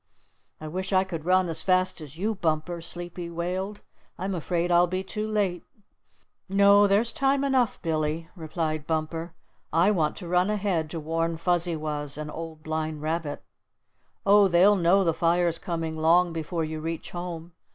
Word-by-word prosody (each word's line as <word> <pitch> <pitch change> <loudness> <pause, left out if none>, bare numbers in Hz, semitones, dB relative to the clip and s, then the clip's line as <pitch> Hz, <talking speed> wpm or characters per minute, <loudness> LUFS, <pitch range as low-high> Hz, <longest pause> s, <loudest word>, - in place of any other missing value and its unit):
"I 155 - -7
wish 185 +5 -4
I 190 -1 +4
could 165 -5 -6
run 185 0 +3
as 165 -1 0
fast 185 -2 +1
as 150 0 -10
you, 210 +5 0
Bumper," 170 -2 -2
Sleepy 175 +1 -5
wailed. 185 +4 -3 0.4
"I'm 190 +2 -3
afraid 175 +1 -1
I'll 175 +1 +5
be 185 +2 -2
too 210 +2 -4
late." 200 -5 0 0.9
"No, 200 +1 +6
there's 215 +4 +2
time 275 0 +1
enough, 260 -4 +1
Billy," 160 0 -1
replied 155 -2 -3
Bumper. 160 +1 -3 0.4
"I 170 +6 +4
want 160 -7 0
to 175 - -7
run 180 +3 +2
ahead 195 -7 0
to 165 - -4
warn 165 +1 -1
Fuzzy 175 0 +1
Wuzz 150 -2 -2
and 150 0 -5
Old 160 -1 -8
Blind 155 -1 -3
Rabbit." 155 -2 -3 0.8
"Oh, 200 0 +6
they'll 190 +3 +5
know 190 +2 +4
the 165 -3 +2
fire's 170 +1 +1
coming 165 -2 -3
long 165 +2 +3
before 165 +1 -3
you 155 0 -5
reach 165 +1 -5
home. 175 -1 -6
170 Hz, 165 wpm, -26 LUFS, 160-185 Hz, 0.9 s, No